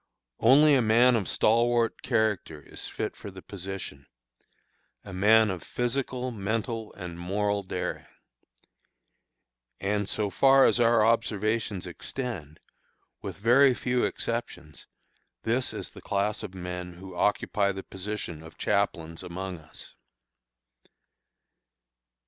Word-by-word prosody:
Only 145 +6 +6
a 135 - +5
man 120 +3 +5
of 105 -5 -1
stalwart 115 +1 +2
character 105 -8 0
is 75 - -7
fit - - -4
for - - -9
the 95 -1 -11
position 95 -8 -7 1.0
a 100 - -9
man 105 +3 +5
of 90 -3 -5
physical, 125 0 -2
mental, 110 +1 -3
and 90 -3 -8
moral 100 +3 0
daring. 95 - -4 1.7
And 100 0 -1
so 105 -2 -1
far 135 +7 +6
as - - +3
our 115 -2 +5
observations 110 -3 0
extend, 90 - -6 0.6
with - - -6
very 125 +5 +5
few 125 0 0
exceptions, 100 - -4 0.6
this 125 +3 0
is - - -6
the - - -12
class 100 +2 -1
of 95 - -7
men 90 -1 -6
who 95 +1 -11
occupy 100 +1 +1
the 95 0 -6
position 95 -4 -5
of 80 0 -13
chaplains 85 -5 -1
among 90 0 -6
us. 80 0 -13
105 Hz, 120 wpm, -27 LUFS, 95-115 Hz, 1.7 s, Only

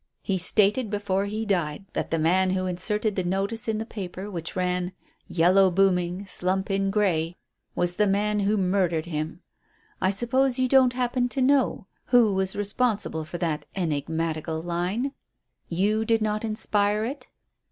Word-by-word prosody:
He 190 -2 -1
stated 210 +5 +3
before 200 -1 -1
he 215 +2 -3
died 175 -4 -1
that - - -2
the 165 - 0
man 180 +4 +3
who 185 0 0
inserted 210 +4 -1
the 185 - 0
notice 195 +5 -1
in 220 -1 0
the 220 - -3
paper 195 -2 -6
which 170 -3 -5
ran, 180 0 -1 0.3
'Yellow 180 +3 +4
booming 180 0 +1
slump 190 +1 -1
in 195 0 +1
Grey,' 180 -5 0 0.4
was 175 0 0
the 210 - +3
man 210 +2 +1
who 205 +1 +1
murdered 180 -4 +1
him. 160 0 -4 0.6
I 190 - +3
suppose 245 +5 +1
you 255 0 +2
don't 255 -1 +5
happen 245 0 0
to 270 - -2
know 270 -6 +2 0.2
who 235 -5 +4
was 190 0 -1
responsible 205 -5 -1
for 165 +3 -6
that 165 -4 -2
enigmatical 160 -1 -2
line? 180 +10 -1 0.6
You 205 +6 +1
did 225 0 +1
not 215 0 -1
inspire 210 -1 +1
it?" 275 +5 -6
195 Hz, 160 wpm, -25 LUFS, 175-215 Hz, 0.6 s, don't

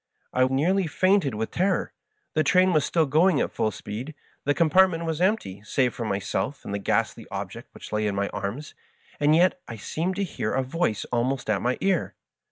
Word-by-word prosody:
I 130 - +3
nearly 165 +8 +1
fainted 185 - +2
with 110 +1 -3
terror. 190 +2 0 0.4
The 155 - +2
train 185 +4 +4
was 155 -3 +3
still 165 +1 +2
going 155 +3 +3
at - - 0
full 110 - 0
speed; 115 +8 -7 0.3
the 145 +1 +2
com 165 -3 +2
partment 185 -2 +4
was 160 0 -2
empty, 185 - 0
save 125 +2 +1
for 115 - -4
myself 105 +7 -2
and 100 - -5
the 100 - -1
ghastly 100 - -1
ob - - -4
ject - - -10
which - - -11
lay 105 0 +1
in 100 - -1
my 100 0 0
arms; 110 +10 -5 0.5
and 150 +1 +4
yet 180 +2 +3
I 115 - -6
seemed 165 - -3
to 200 - -1
hear 185 - -3
a 135 - +1
voice 130 - -1
almost 125 0 0
at 100 - 0
my 125 +1 0
ear. 190 -3 0
145 Hz, 205 wpm, -25 LUFS, 115-175 Hz, 0.5 s, train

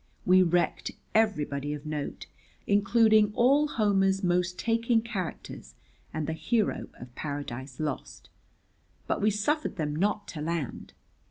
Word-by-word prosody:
We 185 +1 +6
wrecked 175 -1 +1 0.2
everybody 150 -9 +1
of 145 +1 -10
note, 150 -2 -4 0.4
including 210 +1 +4
all 280 +5 +4
Homer's 195 -5 +2
most 180 0 +1
taking 230 0 +1
characters 195 -7 -6 0.4
and 155 -1 -3
the 160 - -2
hero 215 +7 0
of 125 0 -12
Paradise 140 -3 -6
Lost. 150 -3 -5 0.7
But - - -1
we 210 - +4
suffered 220 +10 0
them 150 -4 -2
not 205 +5 0
to 155 - -6
land. 160 -4 -4
185 Hz, 125 wpm, -28 LUFS, 150-215 Hz, 0.7 s, We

